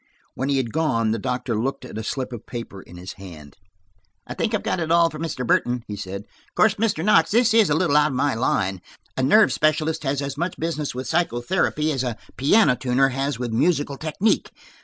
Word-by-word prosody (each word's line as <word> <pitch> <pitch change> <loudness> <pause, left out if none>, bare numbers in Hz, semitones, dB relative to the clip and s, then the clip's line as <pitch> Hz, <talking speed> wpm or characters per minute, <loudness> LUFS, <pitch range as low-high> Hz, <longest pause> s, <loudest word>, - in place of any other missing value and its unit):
When 135 +2 -3
he 140 - +2
had 120 -4 -2
gone 125 -9 +1
the 115 - -1
doctor 125 +1 -2
looked 120 +5 -2
at - - -10
a 110 - -4
slip 130 +3 -4
of 115 - -9
paper 115 -5 -7
in 90 - -14
his 90 +2 -8
hand. 80 -6 -11 0.7
"I - - -6
think 225 -1 -1
I've 210 - -3
got - - -1
it 165 -1 -2
all 170 0 +4
from 155 - -8
Mr. 155 -6 -3
Burton," 120 +1 +1
he 105 - -5
said. 100 -1 -6
"Of - - -32
course, 215 -2 +4
Mr. 205 -6 -1
Knox, 165 -6 +4
this 230 +1 +3
is 225 -5 +5
a 145 - +2
little 160 -3 +1
out 150 0 +5
of 145 - -4
my 140 +2 +1
line; 95 -5 0 0.3
a - - -1
nerve 210 +12 +5
specialist 155 +1 +1
has 135 0 -1
as 140 0 -5
much 175 +1 -2
business 155 -4 -3
with 130 +1 -5
psychotherapy 155 0 0
as 135 -3 -1
a 120 -4 -3 0.2
piano 140 - +4
tuner 130 +2 +2
has 135 0 -2
with 120 -2 -4
musical 145 +2 +1
technique. 160 +9 0
135 Hz, 220 wpm, -23 LUFS, 120-160 Hz, 0.7 s, is